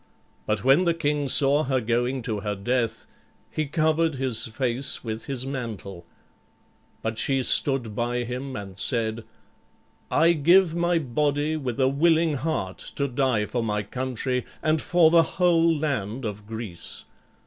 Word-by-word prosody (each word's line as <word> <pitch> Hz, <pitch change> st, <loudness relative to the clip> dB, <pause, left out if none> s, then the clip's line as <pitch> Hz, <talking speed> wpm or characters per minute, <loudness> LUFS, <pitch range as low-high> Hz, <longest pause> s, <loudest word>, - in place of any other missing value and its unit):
But 105 Hz, -2 st, -1 dB
when 135 Hz, +8 st, +4 dB
the 170 Hz, -1 st, +2 dB
king 145 Hz, -3 st, -1 dB
saw 145 Hz, +2 st, +4 dB
her 130 Hz, -1 st, +1 dB
going 120 Hz, +2 st, -1 dB
to 110 Hz, -3 st, -2 dB
her 105 Hz, 0 st, -3 dB
death 115 Hz, +2 st, -2 dB, 0.5 s
he 155 Hz, -1 st, -2 dB
covered 160 Hz, +1 st, +1 dB
his 130 Hz, -4 st, 0 dB
face 125 Hz, +3 st, -1 dB
with 110 Hz, -1 st, -5 dB
his 130 Hz, -2 st, -2 dB
mantle; 110 Hz, -10 st, -6 dB, 1.0 s
but 110 Hz, 0 st, -2 dB
she 135 Hz, -1 st, +1 dB
stood 125 Hz, -5 st, +2 dB
by 120 Hz, +1 st, -1 dB
him, 125 Hz, +2 st, -5 dB
and 100 Hz, -3 st, -7 dB
said, 115 Hz, -2 st, +2 dB, 0.9 s
"I 170 Hz, +1 st, +4 dB
give 170 Hz, +2 st, +4 dB
my 175 Hz, 0 st, +1 dB
body 145 Hz, +2 st, 0 dB
with 130 Hz, -6 st, -4 dB
a 130 Hz, -, +4 dB
willing 160 Hz, +3 st, +2 dB
heart 130 Hz, -, -3 dB, 0.2 s
to 140 Hz, -, 0 dB
die 125 Hz, -5 st, 0 dB
for 120 Hz, +3 st, -2 dB
my 105 Hz, -2 st, -1 dB
country 125 Hz, +2 st, -2 dB, 0.2 s
and 155 Hz, -1 st, +1 dB
for 170 Hz, -2 st, +4 dB
the 170 Hz, 0 st, +6 dB, 0.2 s
whole 170 Hz, -2 st, +4 dB
land 135 Hz, -7 st, -2 dB
of 105 Hz, -1 st, -6 dB
Greece. 110 Hz, -7 st, -7 dB
130 Hz, 150 wpm, -25 LUFS, 115-155 Hz, 1.0 s, the